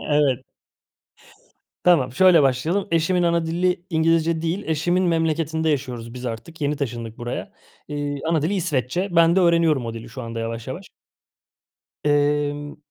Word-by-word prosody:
Evet. 140 -4 +2 1.4
Tamam, 140 -9 +4
şöyle 175 0 +6
başlayalım. 155 +10 +1
Eşimin 170 +2 +2
ana 170 -1 +1
dili 175 +2 0
İngilizce 165 0 +2
değil. 175 +5 -1
Eşimin 175 +4 +1
memleketinde 160 -1 0
yaşıyoruz 125 -5 -3
biz 125 0 -6
artık, 115 +8 -7
yeni 145 0 0
taşındık 120 -5 -5
buraya. 120 0 -5 0.4
Iıı, 145 -1 -3
ana 160 -3 +2
dili 175 +6 0
İsveççe, 175 0 -1
ben 170 +1 +5
de - - +5
öğreniyorum 165 -7 +3
o 115 - -5
dili 115 +1 -8
şu 125 +2 -8
anda 115 0 -5
yavaş 115 0 -5
yavaş. - - -6 1.2
Emm, 145 0 0
150 Hz, 145 wpm, -22 LUFS, 130-170 Hz, 1.4 s, şöyle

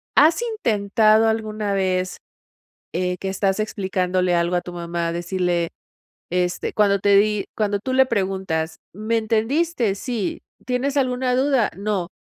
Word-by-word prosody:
¿Has 320 +7 +5
intentado 220 - +2
alguna 215 -2 -1
vez, 185 -1 0 0.8
eh, 180 +1 0
que 195 - -4
estás 195 +1 0
explicándole 185 -3 0
algo 170 +1 +1
a - - +2
tu 180 - -8
mamá, 170 -1 -3
decirle, 175 -1 -1 0.6
este, 180 0 -1
cuando 200 -2 +3
te 200 0 +4
di? 210 0 +2
Cuando 205 -2 0
tú 260 +5 -2
le 265 0 +5
preguntas: 190 -7 -2 0.2
"¿Me 215 +3 -1
entendiste? 230 - 0
'Sí'. 230 -3 -3 0.3
¿Tienes 260 +3 -1
alguna 255 -2 +1
duda? 260 -3 +2
'No'. 200 -3 -2
200 Hz, 135 wpm, -22 LUFS, 180-230 Hz, 0.8 s, Has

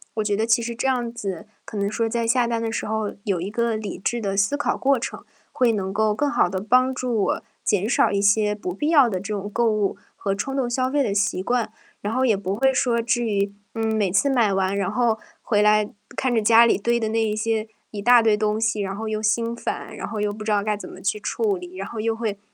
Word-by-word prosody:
我 215 - 0
觉 205 -1 0
得 220 +2 0
其 230 0 +3
实 235 0 -3
这 250 +3 -2
样 240 -3 0
子， 200 -3 -5 0.2
可 215 - -7
能 200 +1 0
说 225 0 0
在 235 0 -1
下 240 +1 +2
单 230 -1 -1
的 225 -1 -2
时 - - -3
候 220 -1 -2
有 190 -4 0
一 190 +4 -4
个 235 0 0
理 215 -2 -5
智 240 +5 -1
的 195 -1 -2
思 205 +9 +2
考 290 - 0
过 275 0 +2
程， 235 - -6 0.3
会 245 -2 +2
能 190 -2 -2
够 215 0 +1
更 290 +4 0
好 - - +3
地 190 0 -3
帮 255 +5 +3
助 240 -5 -1
我 - - 0 0.2
减 205 +1 +1
少 - - +3
一 200 -1 +1
些 210 +1 +3
不 185 -3 -5
必 250 +12 -2
要 285 -7 +6
的 185 -3 -2
这 205 +2 -4
种 205 +1 -4
购 230 +2 +1
物 210 -2 0 0.2
和 195 -1 -2
冲 270 +7 -3
动 255 -3 0
消 255 +1 0
费 285 +1 +1
的 205 -4 -1
习 200 -2 0
惯。 240 0 0 0.3
然 210 +2 -3
后 260 +1 +1
也 220 -6 +3
不 195 0 -3
会 265 +4 +2
说， 240 -3 +1
至 240 +1 0
于， 200 -2 0 0.2
嗯， 225 -1 -1
每 210 -4 +1
次 200 +10 +2
买 235 -7 +2
完， 195 +1 0
然 195 -2 0
后 225 0 +1 0.2
回 210 -2 +1
来 210 0 +4 0.3
看 260 -2 0
着 225 - +2
家 230 +2 +6
里 235 - +3
堆 235 +3 +1
的 220 -2 -1
那 225 +1 +1
一 215 -1 0
些 220 0 -1 0.2
一 205 - -5
大 245 +2 +6
堆 220 -2 +3
东 215 +1 0
西， 220 -1 +1
然 195 -1 -2
后 220 +2 -4
又 215 0 -2
心 230 +2 +1
烦， 235 - -5
然 - - -5
后 215 -2 -4
又 210 0 0
不 215 +1 -8
知 215 - 0
道 205 -1 +2
该 210 -1 -1
怎 - - -9
么 - - -11
去 210 +1 -1
处 410 - -1
理， 360 +1 -10
然 - - -5
后 230 - -7
又 225 +1 0
会 220 -3 -3
220 Hz, 290 characters per minute, -23 LUFS, 205-235 Hz, 0.3 s, 要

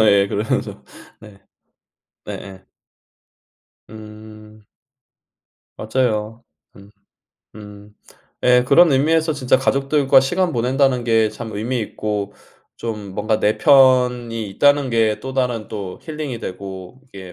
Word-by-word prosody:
예 100 -1 +4
그래야죠. 105 +3 -3 0.4
네. 105 -2 -15 0.8
네 - - -7
예. 95 -1 -11 1.2
음. 110 0 -13 1.1
맞아요. 110 -1 -2 0.3
음. 100 +1 -16 0.7
음. 105 0 -13 0.5
예 125 0 +5
그런 170 +3 +5
의미에서 160 +4 +2
진짜 130 -2 +1
'가족들과 135 0 +2
시간 175 +6 -1
보낸다.'는 130 +1 +1
게 115 -2 +2
참 110 +2 -8
의미 115 +4 -3
있고 105 -1 -4 0.4
좀 105 -4 -6
뭔가 110 +1 -1
'내 105 0 +1
편이 125 -5 +3
있다.'는 145 +5 +2
게 110 -2 +1
또 130 0 -7
다른 125 -4 -1
또 100 -4 -7
힐링이 150 -6 -6
되고 95 +3 -8
이게 95 -4 -11
115 Hz, 210 characters per minute, -19 LUFS, 105-130 Hz, 1.2 s, 예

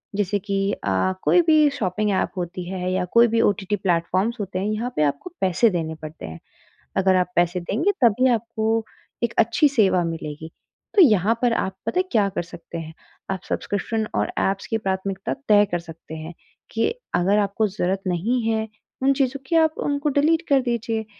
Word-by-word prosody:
जैसे 205 0 0
कि 195 0 -1
अ, 100 - 0
कोई 355 - +5
भी 305 -2 +6
शॉपिंग 210 -5 -1
ऐप 190 - 0
होती 175 0 -4
है 185 -1 -3
या 185 - 0
कोई 235 0 +7
भी 230 0 +1
ओटीटी 205 -1 +1
प्लेटफॉर्म्स 185 +4 0
होते 190 -2 -3
हैं, 200 - -1
यहाँ 230 +3 -2
पे 150 - +2
आपको 150 - -2
पैसे 190 +5 +3
देने 160 -3 -3
पड़ते 155 0 -9
हैं। 80 +1 -8 0.6
अगर 190 -1 +3
आप 180 -1 +1
पैसे 175 +1 +2
देंगे, 255 - 0
तभी 240 +3 +4
आपको 225 0 -1 0.4
एक 235 - -1
अच्छी 235 +6 +4
सेवा 205 -9 +3
मिलेगी। 160 -1 -5 0.4
तो 400 - +7
यहाँ 215 - +4
पर 245 - +3
आप 190 -4 -1
पता 360 - 0
है - - +1
क्या 210 -3 +3
कर - - -1
सकते 170 0 -9
हैं, 160 -1 -7 0.4
आप 190 - -2
सब्सक्रिप्शन 215 +2 -2
और 105 0 0
ऐप्स 195 0 0
की 225 - -1
प्राथमिकता 190 -1 -3 0.2
तय 205 -1 +6
कर 175 - +1
सकते 165 -1 -11
हैं 160 +2 -7 0.4
कि 225 - +1 0.3
अगर 195 +4 +3
आपको 205 +1 +1
ज़रूरत 190 0 -2
नहीं 225 +8 0
है 220 0 0 0.4
उन 275 +1 +4
चीज़ों 270 0 0
की, 330 - +1
आप 315 -1 +4
उनको 290 +1 -1
डिलीट 320 +3 +3
कर 275 -2 +4
दीजिए। 230 -2 -2
200 Hz, 190 wpm, -23 LUFS, 180-235 Hz, 0.6 s, कोई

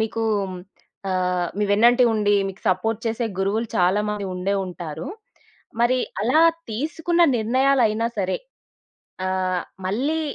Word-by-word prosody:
మీకూ 225 +1 -1 0.9
అహ్, 180 -1 0
మీ 210 - +2
వెన్నంటే 240 +4 +5
ఉండి, 205 -1 +2
మీకు 195 - -10
సపోర్ట్ 210 +4 0
చేసే 225 +1 -1
గురువులు 210 +4 0
చాలా 185 +3 +3
మంది 210 -1 -3
ఉండే 190 +2 -1
ఉంటారు. 170 -4 -7 0.7
మరి, 250 +2 +3 0.2
అలా 255 +9 +3 0.3
తీసుకున్న 320 +8 0
నిర్ణయాలైనా 230 -1 +2
సరే, 190 -1 0 0.9
ఆహ్, 185 -1 -1 0.2
మళ్ళీ, 280 +11 0
215 Hz, 115 wpm, -23 LUFS, 185-240 Hz, 0.9 s, వెన్నంటే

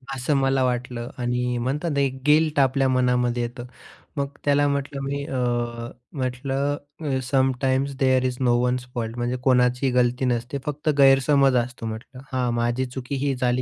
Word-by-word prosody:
असं 130 +3 -1
मला 135 -1 +2
वाटलं 125 -1 -2
आणि 125 0 -1
म्हणतात 145 +7 -2
ना, - - +1
एक 130 -1 -1
गिल्ट 155 -1 +4
आपल्या 135 0 +3
मनामध्ये 125 -1 +1
येतं, 120 +1 -6 0.5
मग 140 0 0 0.2
त्याला 145 0 +3
म्हटलं 140 0 -2
मी 140 +1 -3
अ, 130 - -4 0.8
म्हटलं 135 +3 -1 0.2
अ, 135 -4 -1
sometimes 130 +1 +1
there 130 -1 +3
is 125 -1 -1
no 125 -2 +3
one's 125 0 0
fault 115 -1 -3
म्हणजे 120 +1 -1
कोणाचीही 125 0 +3
गलती 125 +1 +2
नसते 125 +2 -1
फक्त 150 +1 -2
गैरसमज 135 0 +5
असतो 125 -1 -9
म्हटलं. 115 +4 -7
हां, 125 -2 0
माझी 120 +2 0
चुकी 130 +2 -5
ही 140 - +1
झाली 125 0 0
130 Hz, 165 wpm, -24 LUFS, 125-140 Hz, 0.8 s, गैरसमज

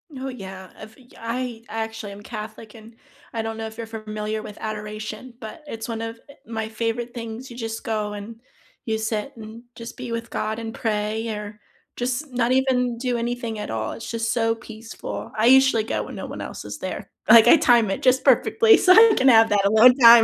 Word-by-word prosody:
Oh, 265 +1 -5
yeah. 190 -6 -9
I've 220 0 -12
y 250 -2 -20
I 230 0 -4
actually 220 -1 -5
am 200 - -11
Catholic, 215 0 -8
and 225 +1 -14 0.4
I 225 - -1
don't 225 0 -4
know 225 0 -4
if 220 0 -11
you're 230 - -5
familiar 215 -1 -4
with 215 -1 -10
adoration, 215 +2 -6
but 230 +7 -9
it's 225 -3 -6
one 225 -1 -3
of, 225 0 -6
eh, 280 - -13
my 220 -2 -4
favorite 230 +2 -3
things, 235 +2 -7
you 235 - -10
just 225 -1 -5
go 210 -2 -2
and 210 +2 -8 0.5
you 220 -1 -1
sit 220 +3 -3
and 225 +1 -10
just 230 0 -9
be 250 -2 -6
with 230 0 -4
God 220 +1 -3
and 225 0 -6
pray, 220 0 -2
or 210 -1 -6 0.4
just 255 +4 -2
not 245 0 +1
even 250 -2 +1
do 245 0 -1
anything 235 -2 -3
at 210 - -5
all, 110 0 -3
it's 225 - -8
just 230 0 -1
so 225 -1 +1
peaceful. 225 0 -8
I 220 +2 +3
usually 265 -3 +5
go 225 - -2
when - - -9
no - - -6
one - - -7
else - - -7
is - - -7
there. - - -6 0.2
Like, 230 -2 +9
I 330 - +8
time 240 -6 +4
it - - -3
just 260 +1 +3
perfectly 450 -1 +5
so 370 - +6
I 445 +2 +8
can 265 - +3
have 225 -3 +7
that 205 -1 +2
alone 220 +5 +7
time. 235 -2 +9
225 Hz, 215 wpm, -23 LUFS, 215-240 Hz, 0.5 s, Like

